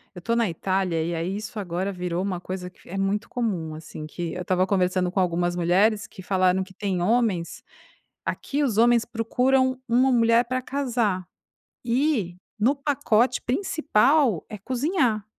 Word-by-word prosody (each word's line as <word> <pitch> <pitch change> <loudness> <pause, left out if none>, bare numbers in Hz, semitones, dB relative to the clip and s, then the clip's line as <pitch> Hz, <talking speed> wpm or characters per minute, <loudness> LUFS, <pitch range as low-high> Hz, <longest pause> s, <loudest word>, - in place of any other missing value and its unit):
eu 180 - -8
tô 230 +5 0
na 230 -5 +2
Itália 180 -1 -1
e 170 +1 -2
aí 175 +4 -2
isso 215 +1 -6
agora 185 +1 -2
virou 180 -1 -3
uma 190 -3 -2
coisa 180 0 -6
que - - -23
é 195 - -5
muito 200 +3 -1
comum 185 -10 -2
assim, 155 -1 -8
que 170 +2 -5
eu 180 - -5
estava 185 +1 +1
conversando 185 -2 +1
com 190 - -1
algumas 175 -1 +1
mulheres 200 +5 +2
que 190 - -12
falaram 185 0 +2
que 190 0 -14
tem 190 -3 -2
homens, 210 -5 0 0.6
aqui 290 +1 -2
os 225 -6 0
homens 235 -1 +4
procuram 260 +3 +1
uma 255 +3 +3
mulher 230 0 +4
para 255 +1 -2
casar 240 -9 -1 0.6
e 235 - 0 0.2
no 255 +7 +3
pacote 265 -4 +1
principal 275 - +2
é 210 - -7
cozinhar, 250 - 0
205 Hz, 165 wpm, -25 LUFS, 180-245 Hz, 0.6 s, homens